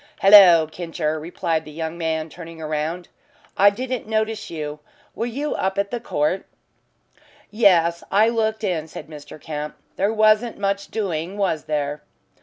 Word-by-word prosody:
"Hallo, 195 -5 +8
Kincher," 160 -1 -3
replied 160 0 -2
the 155 - -12
young 160 +1 -5
man, 160 -2 -2
turning 165 0 -11
round. 155 +3 -3 0.5
"I 200 +1 +6
didn't 250 +2 -4
notice 220 0 -1
you. 150 -2 -5 0.3
Were 230 - -3
you 280 +5 -3
up 190 +1 -2
at 200 0 -1
the 240 - -2
court?" 180 -3 -1 1.0
"Yes, 175 -6 +3
I 210 +3 +4
looked 220 -1 0
in," 170 -6 -1
said - - -9
Mr. 150 0 -11
Kemp. 150 0 -6 0.2
"There 200 +3 +1
wasn't 215 +1 +3
much 200 0 -1
doing, 185 -3 -3
was 185 -6 -1
there?" 150 -1 -2
175 Hz, 150 wpm, -22 LUFS, 160-215 Hz, 1.0 s, Hallo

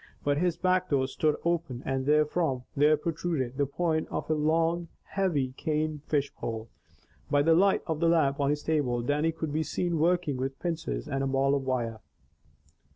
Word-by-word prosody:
But 145 0 +1
his 175 -1 +1
back 185 0 +1
door 135 -2 +2
stood 150 +3 +1
open 165 -7 -1
and 135 0 -1
therefrom 150 -3 +2
there 150 +2 +4
protruded 155 -5 -2
the 140 -1 +1
point 160 +2 -1
of - - -3
a - - +5
long, 165 +3 +1 0.2
heavy 150 -10 -1
cane 155 -1 -1
fish 145 -2 0
pole. 115 -1 -5 0.6
By 145 0 +3
the 165 +2 +5
light 195 +4 +3
of 160 -1 -3
a 170 - +4
lamp 150 -5 +3
on 140 -1 +2
his 150 0 -1
table, 130 -7 0
Dannie 150 +5 +1
could 160 -2 -4
be 155 - +1
seen 170 +1 -1
working 170 -4 +1
with 135 +1 -3
pincers 165 -3 -3
and 135 -2 -1
a - - 0
ball 135 +1 +2
of 140 - +1
wire. 115 -4 -1
150 Hz, 185 wpm, -28 LUFS, 135-165 Hz, 0.6 s, a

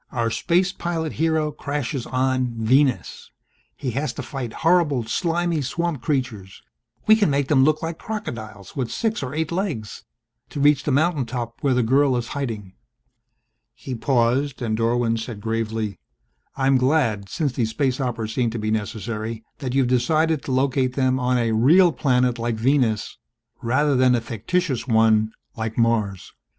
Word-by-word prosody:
Our 115 -2 -1
space 180 +8 +1
pilot 165 -4 -3
hero 160 -2 +1
crashes 145 -3 -4
on 130 -1 0
Venus. 130 +4 +1 0.5
He 130 -3 -3
has 140 +5 -2
to - - -6
fight 135 -6 -5
horrible 165 -7 +3
slimy 170 +6 0
swamp 160 +1 -2
creatures 115 -9 -3 0.4
we 215 - +7
can 210 -5 +2
make 140 -1 0
them 135 -3 +5
look 155 +3 +2
like 165 0 -4
crocodiles 110 - -6
with 130 -4 -2
six 225 -2 -1
or 135 +1 -5
eight 160 0 -1
legs 165 - -3 0.5
to - - -6
reach 145 0 +4
the 150 - +1
mountaintop 130 -6 -1
where 135 -3 +2
the 125 - +2
girl 135 +2 +3
is 120 0 -4
hiding 115 -9 -4 0.5
..." 115 -1 -51 0.3
He 130 +1 -7
paused 125 +2 +1
and 110 -3 -1
Dorwin 115 0 +1
said 110 -1 -6
gravely, 110 -1 -3 0.6
"I'm 135 0 +3
glad, 125 -8 +1
since 150 -7 -1
these 115 -3 0
space 130 +2 -1
operas 115 -4 -3
seem 120 -1 +1
to 115 - -5
be 110 0 -2
necessary, 110 +1 -3 0.2
that 130 -2 -3
you 135 - +4
have 125 - -1
decided 155 +5 +2
to - - -3
locate 130 0 +1
them 130 -1 +1
on 125 0 +1
a 115 -2 +1
real 160 +11 +5
planet 125 -3 +1
like 115 0 -1
Venus 115 -2 0 0.4
rather 140 +5 +2
than 125 -1 +4
a - - +1
fictitious 130 - -2
one 110 -2 +3 0.2
like 110 -1 -4
Mars. 110 -5 0
130 Hz, 165 wpm, -23 LUFS, 115-145 Hz, 0.6 s, we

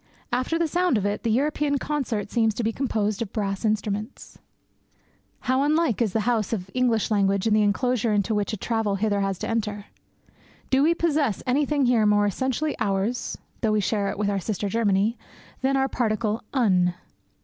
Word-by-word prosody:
After 255 +7 0
the 335 -1 +1
sound 350 -4 +1
of 200 - -1
it, 205 0 -1
the 230 - -1
European 285 +4 +1
concert 255 -8 -2
seems 225 -3 +2
to 235 - -2
be 225 - +1
composed 215 -5 -1
of 215 -4 -3
brass 195 -2 -2
instruments. 215 +1 -3 1.0
How 260 +1 +1
unlike 300 - +2
is 220 -4 +2
the 220 - 0
house 225 -2 0
of 195 -3 -4
English 240 -4 +1
language 200 -1 +2
and 215 -1 +3
the 215 - +4
enclosure 230 +2 +1
into 205 +1 +1
which 210 -1 0
a 215 - -3
traveller 220 -1 -1
hither 205 0 0
has 195 -1 -1
to - - -4
enter! 210 -3 -2 0.9
Do 265 +1 +4
we 325 +4 +4
possess 300 - 0
anything 280 +2 +1
here 235 -4 +3
more 205 0 +4
essentially 260 - -1
ours 205 +4 -1 0.2
(though 215 -1 +2
we 215 - +2
share 200 0 0
it - - -4
with 205 0 0
our 200 - 0
sister 205 +1 -3
Germany) 210 +1 +1 0.4
than 270 +1 +2
our 270 0 +2
particle 220 -3 -1
"un"? 185 -9 +2
220 Hz, 185 wpm, -25 LUFS, 205-255 Hz, 1.0 s, the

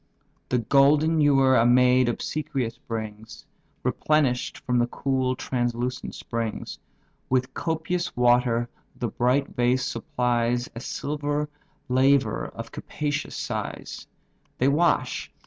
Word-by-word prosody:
The 125 - +2
golden 145 +6 +4
ewer 135 -2 +5
a 115 - +5
maid 125 +1 +5
obsequious 135 -2 -3
brings, 110 -1 -7 0.4
Replenish'd 145 -5 +1
from 125 -3 0
the 120 - +2
cool, 130 0 -1
translucent 125 0 -2
springs; 115 -2 -4 0.5
With 130 0 +1
copious 165 +2 -2
water 120 -1 +3 0.3
the 120 - -3
bright 125 +5 +1
vase 125 +1 +1
supplies 120 0 0
A 115 - -6
silver 145 +3 -2 0.4
laver 135 +2 +2
of - - -9
capacious 150 0 -4
size; - - -5 0.5
They 130 - +2
wash. 155 +5 +1
125 Hz, 110 wpm, -25 LUFS, 120-145 Hz, 0.5 s, ewer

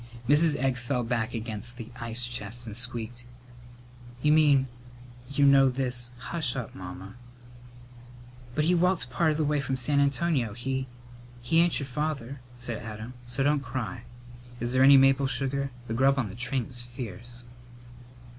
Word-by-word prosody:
Mrs. 150 +2 +4
Egg 130 -1 0
fell 125 +1 -1
back 115 -1 -1
against 115 +1 -4
the 115 -1 -8
ice 115 0 -1
chest 120 0 -5
and 110 -2 -7
squeaked: 120 0 -4 1.0
"You 150 - +4
mean 145 -4 +5 0.6
you 140 0 +3
know 135 -1 +7
this 125 -2 -3
" - - -20
"Hush 155 -7 -1
up, 125 -4 -5
Mamma!" 90 +1 -8 1.4
"But 150 - +2
he 175 - +4
walked 175 -6 +2
part 155 +2 +2
the 155 - +1
way 150 0 +1
from 135 -1 -2
San 140 +3 +1
Antonio. 140 -4 +1
He 130 +3 -3 0.3
" 120 0 -19
"He 160 +7 +3
ain't 170 0 +3
your 140 - -3
father," 140 -1 -3 0.2
said 120 -2 -5
Adam, 110 +2 -7
"so 130 +3 0
don't 145 +1 +3
cry. 125 -7 -4 0.6
Is 120 +1 -2
there 130 - +3
any 135 +1 +9
maple 135 0 +5
sugar? 135 +1 -1 0.2
The 110 - -3
grub 135 +3 +3
on 120 -6 0
the 100 - -9
train 125 0 -1
was 125 -1 -7
fierce." 120 0 -8
125 Hz, 165 wpm, -28 LUFS, 120-140 Hz, 1.4 s, any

